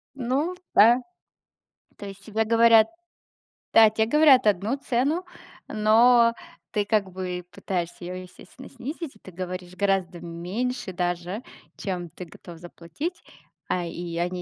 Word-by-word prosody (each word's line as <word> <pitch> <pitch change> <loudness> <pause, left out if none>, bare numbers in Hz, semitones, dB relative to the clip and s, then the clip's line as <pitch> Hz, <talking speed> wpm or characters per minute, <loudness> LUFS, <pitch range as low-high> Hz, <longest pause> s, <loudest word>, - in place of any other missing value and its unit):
Ну 275 +7 -1 0.2
да. 235 +3 +7 1.0
То 205 - -9
есть 195 0 -9
тебе 220 0 -1
говорят 230 0 +6 0.9
Да, 220 -1 +8
тебе 220 +1 0
говорят 285 -1 +6
одну 210 +6 +1
цену, 280 +7 0 0.4
но 230 +2 +5 0.4
ты 205 -2 0
как 205 -3 0
бы 180 -1 -5
пытаешься 175 -2 -4
её, 180 - -5
естественно, 185 +7 -13
снизить, 275 +3 -7
и 215 - -20
ты 185 - -13
говоришь 180 0 -6
гораздо 190 -3 0
меньше 190 +7 -4
даже, 175 +4 -2 0.4
чем 180 -3 -4
ты 180 - -9
готов 170 +1 -13
заплатить, 175 - -7 0.4
а, 180 - -1
и 170 0 -6
они, 180 +1 -2
205 Hz, 135 wpm, -25 LUFS, 180-235 Hz, 1.0 s, Да